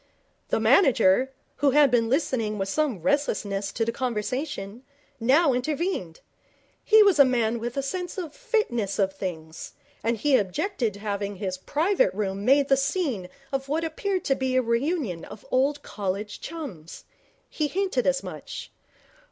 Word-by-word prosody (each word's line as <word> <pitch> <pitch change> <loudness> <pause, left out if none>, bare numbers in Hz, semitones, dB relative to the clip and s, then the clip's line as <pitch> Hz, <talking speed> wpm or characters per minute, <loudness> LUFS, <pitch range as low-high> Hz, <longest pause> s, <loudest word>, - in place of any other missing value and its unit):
The - - +1
manager, 250 - +4 0.3
who 285 - +3
had 290 -3 +6
been 230 -2 +2
listening 240 -6 0
with 195 -1 -2
some 255 - -1
restlessness 200 -8 0
to 225 - 0
the 230 - 0
conversation, 240 -2 -3 0.4
now 270 +5 +4
intervened. 260 - -2 0.6
He 430 0 +7
was 395 -6 +4
a - - +11
man 235 -3 +1
with 240 +3 -5
a 275 - 0
sense 360 +7 -4
of 335 -6 -5
fitness 335 - -1
of 195 -1 +1
things, 165 -5 -6 0.3
and 230 +1 +1
he 275 +4 +3
objected 215 - -1
to - - -11
having 200 -1 -3
his 185 -1 -4
private 365 - +1
room 200 -1 -2
made 275 +4 +4
the 270 - +4
scene 270 - -1 0.2
of 270 0 -3
what 315 +3 0
appeared 370 +4 -2
to 270 - +2
be 260 -1 -1
a 255 - +4
reunion 235 - -1
of 205 - -11
old 280 +3 +1
college 205 +1 -4
chums. 245 - -8 0.4
He 305 - -1
hinted 390 +8 0
as - - +2
much. - - -8
255 Hz, 160 wpm, -26 LUFS, 205-300 Hz, 0.6 s, a